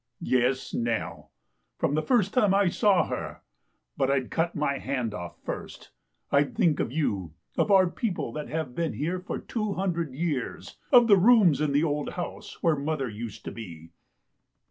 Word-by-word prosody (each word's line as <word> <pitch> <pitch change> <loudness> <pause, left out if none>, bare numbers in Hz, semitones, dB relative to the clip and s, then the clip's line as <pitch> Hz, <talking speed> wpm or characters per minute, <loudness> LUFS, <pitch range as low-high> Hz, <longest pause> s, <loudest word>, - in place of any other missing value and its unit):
" 120 - -55 0.2
Yes, 130 +2 -1
Nell. 115 -1 -3 0.5
From - - 0
the 155 - +2
first 210 -2 +2
time 210 -7 +3
I 200 -2 +4
saw 200 0 +3
her. - - -5 0.5
But 135 - +1
I'd 135 -2 0
cut 170 +1 0
my 140 -3 0
hand 125 -5 -2
off 85 -4 -7
first. - - -7 0.4
I'd 140 +8 +2
think 175 -9 +2
of 115 - -1
you; 100 - -1 0.2
of - - +1
our 190 -2 +6
peo 220 +5 -2
ple - - -4
that 150 -1 -5
have 155 -5 -3
been 165 +3 -2
here 170 +5 -2
for 180 - -5
two 215 -3 -3
hundred 170 -8 -2
years; 150 -4 -3
of 240 -2 +7
the 200 -3 +7
rooms 195 - +5
in 150 -2 +1
the 145 +2 +3
old 150 -2 -1
house 175 - -7
where 165 -2 +4
mother 145 -1 -2
used 110 0 -8
to - - -4
be." 85 -7 -10
155 Hz, 185 wpm, -27 LUFS, 130-185 Hz, 0.5 s, of